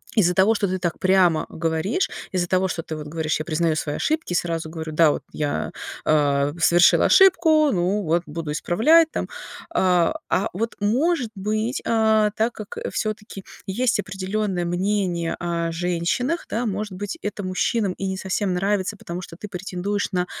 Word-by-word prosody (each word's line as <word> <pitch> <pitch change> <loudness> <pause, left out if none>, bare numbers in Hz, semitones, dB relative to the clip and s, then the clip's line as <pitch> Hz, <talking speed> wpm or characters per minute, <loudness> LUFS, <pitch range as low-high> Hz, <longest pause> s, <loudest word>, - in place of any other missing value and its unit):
из-за 180 -5 +4
того, 195 +5 +4
что 205 - 0
ты 185 0 -2
так 170 -1 -2
прямо 185 -4 +3
говоришь, 165 - -1 0.2
из-за 180 -2 0
того, 185 +1 +2
что 165 - -3
ты 160 - -6
вот 150 -1 -7
говоришь: 155 0 -1
"Я 155 - -4
признаю 160 0 +1
свои 150 -1 -2
ошибки 310 - -1
и - - 0
сразу 165 -2 -1
говорю, 160 -1 -6
да, 155 -1 +5
вот - - -4
я, 150 -1 -2 0.3
э, 145 -1 +2
совершила 175 +2 +5
ошибку, 330 -5 +5
ну 185 +3 +1
вот 170 +1 +1
буду 160 0 -5
исправлять 310 - +4
там". - - -3 0.4
А, 180 - +2
а 190 - +1
вот, 225 +5 -3
может 250 +6 +1
быть, 215 +5 -2
а, 220 -2 +3
так 225 +2 0
как 215 -2 -9
всё-таки 210 -2 -4 0.2
есть 225 +3 +1
определённое 190 -1 -2
мнение 175 -1 -1
о 170 -1 -2
женщинах, 180 - -1
да, 235 +3 -1
может 210 -1 -3
быть, 205 - -5
это 205 -1 -4
мужчинам 190 +3 0
и 195 - -4
не 190 0 -3
совсем 190 0 -1
нравится, 195 +2 0
потому 175 -1 -6
что 165 - -10
ты 210 - -8
претендуешь 195 +2 -3
на 180 -1 +1
185 Hz, 175 wpm, -23 LUFS, 170-215 Hz, 0.4 s, да